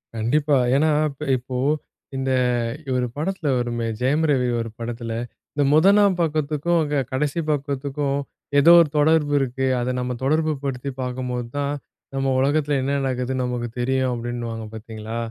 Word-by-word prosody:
கண்டிப்பா. 140 +6 +2 0.2
ஏன்னா 155 +3 +3 0.2
இப்ப 140 +2 -9
இப்போ, 125 +1 -6 0.6
இந்த 135 0 -1 0.6
ஒரு 125 -1 +1
படத்துல 160 +1 -2
வருமே 120 -1 -2
ஜெயம் 145 +5 +2
ரவி 125 -3 +2
ஒரு 115 0 -3
படத்துல, 115 0 -5 0.4
"இந்த 145 -1 +1
முதலாம் 195 +4 +5
பக்கத்துக்கும், 155 +1 0
அங்க 145 -1 -1
கடைசி 145 +4 -1
பக்கத்துக்கும் 140 0 -1 0.4
ஏதோ 165 +4 +7
ஒரு 155 - +2
தொடர்பு 150 -1 +3
இருக்கு. 130 0 -1
அத 120 +1 -1
நம்ம 125 0 -2
தொடர்பு 155 +3 +2
படுத்தி 135 0 -3
பாக்கும்போது 125 -1 -3
தான் 140 0 0 0.4
நம்ம 135 0 -1
உலகத்துல 145 +1 +2
என்ன 140 +2 -1
நடக்குதுன்னு 130 0 -1
நமக்கு 120 -1 -3
தெரியும்." 130 0 +1
அப்டின்னுவாங்க 120 -1 -4
பாத்தீங்களா? 110 0 -7
135 Hz, 140 wpm, -23 LUFS, 125-150 Hz, 0.6 s, ஏதோ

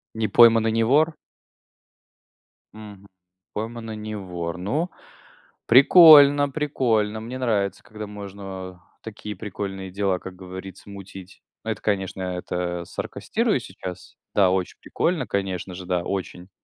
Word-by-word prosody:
Не 110 -1 0
пойман 115 +1 +6
и 110 - +2
не 115 0 +1
вор? 150 +7 +3 1.6
Мгм. 105 -2 -12 0.5
Пойман 115 +1 -5
и - - -5
не 110 0 -6
вор. 90 -3 -5
Ну, 145 - -2 0.8
прикольно, 145 +1 +8
прикольно. 120 -8 0
Мне 120 +4 -7
нравится, 100 -6 -1
когда 105 -1 -8
можно, 100 -1 -9 0.3
а, 90 - -18 0.3
такие 105 -1 -7
прикольные 95 -1 -6
дела, 95 -1 0
как 95 0 -9
говорится, 95 +1 -10
мутить. 95 -1 -11 0.2
Это, 110 -2 -4
конечно, 95 -2 -2
это 90 -1 -3
саркастирую - - -2
сейчас. 90 -1 -9 0.2
Да, 95 -3 +4
очень 95 -1 -2
прикольно, 170 -2 -1
конечно 95 -2 -3
же, 95 +1 -8
да, 90 -1 -1
очень. 95 -1 -5
100 Hz, 130 wpm, -23 LUFS, 95-115 Hz, 1.6 s, прикольно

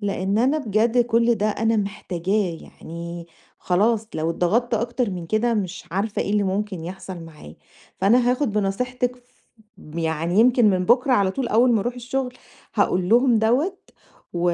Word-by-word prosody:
لإن 200 0 -1
أنا 265 +6 +2
بجد 230 -1 +1
كل 235 0 +2
ده 210 -1 -1
أنا 225 +2 0
محتاجاه، 195 -2 -2
يعني 170 +1 -9 0.3
خلاص 215 +5 +1
لو 160 +1 -1
اتضغطت 220 +9 +1
أكتر 235 +1 -1
من 175 -3 -6
كده 230 +4 +1
مش 185 -3 -3
عارفة 200 +4 -1
إيه - - -4
اللي 210 0 +2
ممكن 190 -3 -2
يحصل 185 0 -7
معايا، 155 - -12 0.4
فأنا 240 +6 +4
هاخد 250 -2 0
بنصيحتِك 245 +5 -1
ف 250 - -23 0.7
يعني 165 +4 0
يمكن 240 -3 +5
من 185 -1 0
بُكرة 250 +4 +3
على 200 -5 +3
طول 255 +4 -3
أوّل 240 +3 +4
ما 225 - +2
أروح 240 +4 -3
الشغل 250 +1 -3 0.4
هاقول 180 0 +1
لهم 240 +2 +4
دَوَّة، 265 - +1 0.5
و 175 - -3
210 Hz, 160 wpm, -23 LUFS, 185-240 Hz, 0.7 s, يمكن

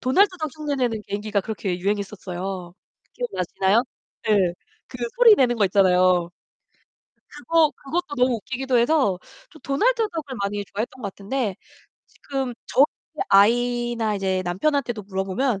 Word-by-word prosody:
도날드 370 +12 +4
덕 310 -2 -3
흉내 295 -2 -2
내는 235 -5 -1
개인기가 205 0 -1
그렇게 195 -3 -3
유행했었어요. 190 -2 -4 0.4
기억나시나요? 200 - 0 0.4
네. 200 -5 +2 0.3
그 250 - -10 0.2
소리 465 -3 +8
내는 245 - +2
거 210 - +3
있잖아요. 180 -2 +3 1.0
그거 310 +1 +2
그것도 300 +1 -4
너무 250 0 +3
웃기기도 260 +3 -1
해서 240 - +2 0.3
좀 315 -4 -17
도날드 450 - +1
덕을 300 -6 -5
많이 205 +1 -2
좋아했던 235 +6 -5
것 200 - -3
같은데 205 +1 -3 0.5
지금 270 -3 -4
저희 275 - +5 0.4
아이나 240 +1 +3
이제 190 -1 -1
남편한테도 235 +4 -1
물어보면 195 +4 -1
230 Hz, 325 characters per minute, -23 LUFS, 195-275 Hz, 1.0 s, 소리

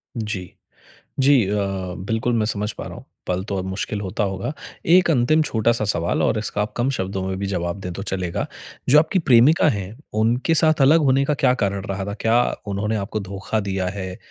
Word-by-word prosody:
जी। 105 -5 -4 0.7
जी 135 -3 +5
अ, 105 +2 0 0.4
बिल्कुल 110 +5 -1
मैं 110 -1 +1
समझ 105 -1 -2
पा - - -8
रहा - - -7
हूँ, - - -11 0.2
पल 90 0 -1
तो 100 -2 -3
और 95 - -1
मुश्किल 95 +2 -3
होता 100 +1 -2
होगा। 95 +6 -3 0.4
एक 180 -2 +5
अंतिम 155 +3 +3
छोटा-सा 115 -4 +1
सवाल 85 -5 0
और 110 - +1
इसका 105 -1 -1
आप 105 - -4
कम 120 +3 +1
शब्दों 95 0 -3
में 95 - -2
भी 100 - -2
जवाब 90 0 -3
दें 90 -2 -5
तो 95 - -6
चलेगा। 95 -3 -3 0.4
जो 145 +4 +7
आपकी 160 +5 +2
प्रेमिका 145 +2 +5
हैं, 100 -3 -3 0.2
उनके 115 +9 +1
साथ 155 -1 +3
अलग 155 +5 +6
होने 135 0 +3
का 150 - +1
क्या 130 -2 +3
कारण 100 0 -2
रहा 95 0 -3
था, 100 - -4
क्या 115 +3 +2 0.2
उन्होंने 105 +2 -1
आपको 105 +1 -3
धोखा 100 +2 -3
दिया 95 -2 -2
है 95 -2 -5
105 Hz, 205 wpm, -22 LUFS, 95-125 Hz, 0.7 s, जो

